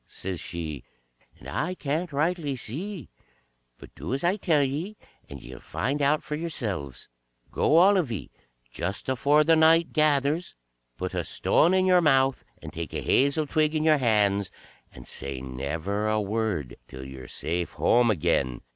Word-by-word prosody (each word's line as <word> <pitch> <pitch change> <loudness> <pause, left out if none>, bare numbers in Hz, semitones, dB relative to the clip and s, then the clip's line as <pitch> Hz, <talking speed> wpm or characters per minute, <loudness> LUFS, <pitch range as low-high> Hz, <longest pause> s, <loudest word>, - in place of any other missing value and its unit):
says 95 -2 -5
she, 80 -7 -6 0.5
"and - - -13
I 180 +4 -2
can't 155 +2 -3
rightly 150 0 -1
see, 160 - -5 0.7
but - - -14
do 130 - -4
as 135 - -4
I 175 +3 +2
tell 160 -8 +2
ye, 160 +10 -3 0.3
and 70 -2 -10
ye 65 - -10
'll - - -11
find 140 - -3
out 145 +2 +2
for - - -6
yourselves. 110 - -4 0.4
Go 160 - +2
all 195 +4 +6
of 160 -10 0
ye, 110 - -6 0.4
just 95 +9 -4
afore 145 +4 +3
the 165 +2 +4
night 160 +1 +4
gathers, 150 +2 +1 0.4
put - - -4
a - - -1
stone 175 +4 +2
in 185 0 +3
your 180 -1 +5
mouth, 135 -4 +3 0.2
and - - -8
take 85 -2 -6
a - - -2
hazel 140 +3 +2
twig 155 +1 +1
in 155 - 0
your 155 -2 +4
hands, 105 -5 +2 0.4
and 60 - -13
say 70 -1 -6
never 80 +11 -3
a 110 0 +1
word 105 - -2
till 65 0 -9
you're 65 -1 -10
safe 85 0 -3
home 120 0 +3
again. 75 - 0
135 Hz, 170 wpm, -26 LUFS, -, 0.7 s, all